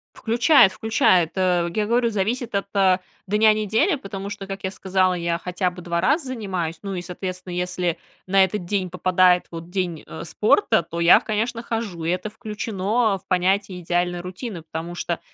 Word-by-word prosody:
Включает, 235 -2 +4
включает. 185 -6 +2
Э, 180 -2 +2
я 210 -1 +1
говорю, 235 0 +2
зависит 225 +4 -2
от, 200 0 -1
а, 190 -1 +4 0.3
дня 215 +2 +4
недели, 220 - +1
потому 200 -5 -6
что, 205 -2 -7
как 195 0 -7
я 190 - -1
сказала, 190 -1 +1
я 170 0 -1
хотя 180 0 -2
бы 180 0 -10
2 170 0 -2
раза 275 - +1
занимаюсь. 185 -9 -3
Ну, 195 -1 -4
и 180 - -3
соответственно, 185 0 -6
если 180 -1 -1 0.3
на 195 0 +5
этот 190 0 -1
день 190 -1 -1
попадает 180 0 +3
вот 165 +1 -9
день, 180 -4 -2
э, 160 - -8
спорта, 210 - +2
то 170 +1 -6
я, 170 +1 +7
конечно, 230 +2 -2
хожу, 225 -8 -4
и 170 - +1
это 185 +4 -2
включено 215 -1 -1
в - - -21
понятие 185 +1 +1
идеальной 175 +1 -1
рутины, 185 +1 -7
потому 165 +2 -6
что 170 -1 -3
190 Hz, 180 wpm, -23 LUFS, 175-215 Hz, 0.3 s, я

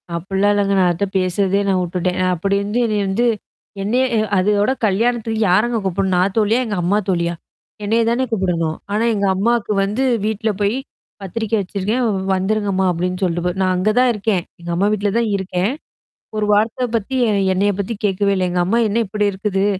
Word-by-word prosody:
அப்டிலாம் 195 +4 +1
இல்லங்க. 200 -1 +1
நான் 180 -1 +4
அதுட்ட 195 +4 -1
பேசுறதே 190 +2 +1
நான் 190 -1 +2
விட்டுட்டேன். 180 +1 -2
நான் 185 0 +2
அப்படி 195 +4 0
வந்து 210 +4 -1
என்னைய 210 -2 0
வந்து 215 +6 +1 0.6
என்னைய 245 +6 +1 0.3
அதோட 205 +5 +2
கல்யாணத்துக்கு 225 +2 0
யாரங்க 225 +6 +2
கூப்பிடணும்? 190 0 0
நான் 190 +2 +2
தோழியா? 220 +3 +3
எங்க 210 - -3
அம்மா 190 +4 +2
தோழியா? 170 -2 0 0.5
என்னைய 225 +3 +2
தானே 245 +2 +1
கூப்பிடணும். 175 -6 0 0.2
ஆனா 215 +2 +1
எங்க 200 -1 0
அம்மாக்கு 225 +2 0
வந்து 210 +7 -1 0.2
வீட்ல 220 0 -1
போய் 205 +3 +1 0.5
"பத்திரிக்கை 220 +3 -2
வச்சிருக்கேன். 205 +6 -2 0.3
வந்துருங்கம்மா" 195 0 0
அப்டின்னு 180 +2 -2
சொல்ட்டு 175 -1 0
போகுது, 180 +2 -1
நான் 185 -1 +2
அங்க 185 +4 +1
தான் 255 0 +4
இருக்கேன். 205 -4 -1 0.2
எங்க 175 - -8
அம்மா 195 +4 +2
வீட்ல 205 -1 0
தான் 235 -2 +1
இருக்கேன். 190 +2 -1 0.7
ஒரு 210 -1 0
வார்த்த 220 +4 +1
பத்தி 230 +5 -3 0.4
என்னைய 200 +2 +2
பத்தி 200 +4 -3
கேட்கவே 200 0 +1
இல்ல. 185 -1 +1
எங்க 180 0 0
அம்மா 230 +5 +2
"என்ன 220 +3 0
இப்படி 210 +1 -1
இருக்குது? 195 0 -1
200 Hz, 175 wpm, -19 LUFS, 185-215 Hz, 0.7 s, நான்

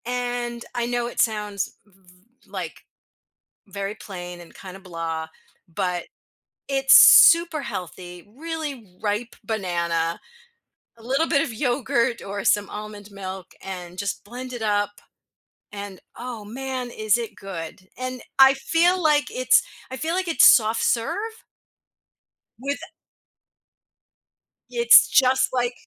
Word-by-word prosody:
And 245 -1 -3
I 240 -1 0
know 240 0 -1
it 240 - -7
sounds 210 -3 -1
v 205 - -28
v 180 0 -20 0.4
like, - - -7 0.8
very 200 +1 -5
plain 180 -4 -9
and 170 - -15
kinda, 190 0 -11
blah, 165 -3 -5 0.5
but 180 +1 -2 0.6
it's 270 0 +4
super 335 -3 +7
healthy, 180 -2 -7
really 290 - -6
ripe 215 +3 -2
banana, 170 -5 -2 0.8
a - - -17
little 270 +7 0
bit 285 -4 +3
of - - -4
yogurt 240 -1 0
or 200 0 -5
some 205 -1 +2
almond 210 -1 -8
milk, 190 -2 -8
and 180 -2 -8
just 200 0 -4
blend 250 +4 -8
it 245 - -6
up. 205 -1 +1 0.8
And 200 -2 -8 0.2
oh, 240 -3 -7
man, 255 +2 -5
is 215 -2 +1
it 230 -2 -6
good? 185 -1 -8
And 255 0 -5 0.2
I 270 0 +8
feel 340 +6 +2 0.3
it's 255 0 +4 0.3
I 260 - -5
feel 320 +5 -2
like 375 -1 -1
it's 330 - +6
soft 220 -1 +5
serve 230 -1 0 1.4
with, 280 +3 -3
eh - - -11 1.8
it's 470 0 +7
just 265 -1 +3
like 245 -1 0
225 Hz, 130 wpm, -23 LUFS, 195-255 Hz, 1.8 s, I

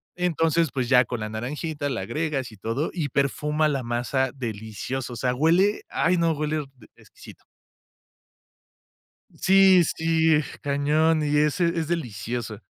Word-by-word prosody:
Entonces, 165 -2 +1
pues, 130 -3 -1
ya 125 -2 +6
con 120 - -4
la 110 - -4
naranjita 145 +6 -4
la 125 - -3
agregas, 135 -1 -3
y - - -14
todo 115 +10 -2
y 155 -6 -2
perfuma 150 +3 0
la 140 -3 -1
masa 125 +2 -1
delicioso. 120 +1 -5
O - - -7
sea, 125 +2 0
huele, 175 +8 +3
ay 180 +2 +1
no, 165 -1 +2
huele 150 0 -2 0.4
e - - -21
exquisito. - - -15 1.9
Sí, 190 -1 +5
sí, 160 -1 +3 0.2
cañón 150 +3 +2
y 150 0 0
ese 150 +4 +2
es 160 -2 -2
delicioso. 120 - -4
145 Hz, 140 wpm, -24 LUFS, 125-160 Hz, 1.9 s, ya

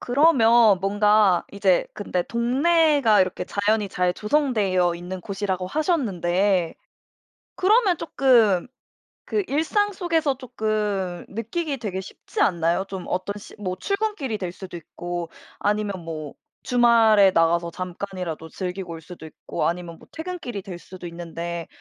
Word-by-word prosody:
그러면 235 - +5
뭔가 205 -1 +3
이제 195 -2 +2
근데 185 -3 -2
동네가 265 - +3
이렇게 185 -1 0
자연이 205 +2 0
잘 180 -1 0
조성되어 210 - +1
있는 180 +2 -6
곳이라고 190 -1 -3
하셨는데 195 - +1 0.8
그러면 405 -1 +3
쪼끔 235 - +3 0.6
그 420 - 0
일상 370 +8 +1
속에서 330 -7 0
쪼끔 210 -7 -2
느끼기 275 +8 -3
되게 195 -6 -4
쉽지 - - -6
않나요? 170 +1 +2
좀 190 -2 -6
어떤 185 +2 -2
시 205 - -12
뭐 185 -3 -3
출근길이 395 - -2
될 180 -2 -3
수도 180 -1 -9
있고 175 +1 -6 0.3
아니면 205 -3 -1
뭐 155 -3 -6 0.3
주말에 230 -5 +5
나가서 170 0 +2
잠깐이라도 180 -2 -5
즐기고 180 0 -5
올 165 - -8
수도 170 0 -11
있고 155 - -3
아니면 170 0 -4
뭐 - - -17
퇴근길이 320 - -6
될 180 -2 -8
수도 180 0 -11
있는데 170 0 -6
200 Hz, 295 characters per minute, -24 LUFS, 180-245 Hz, 0.8 s, 그러면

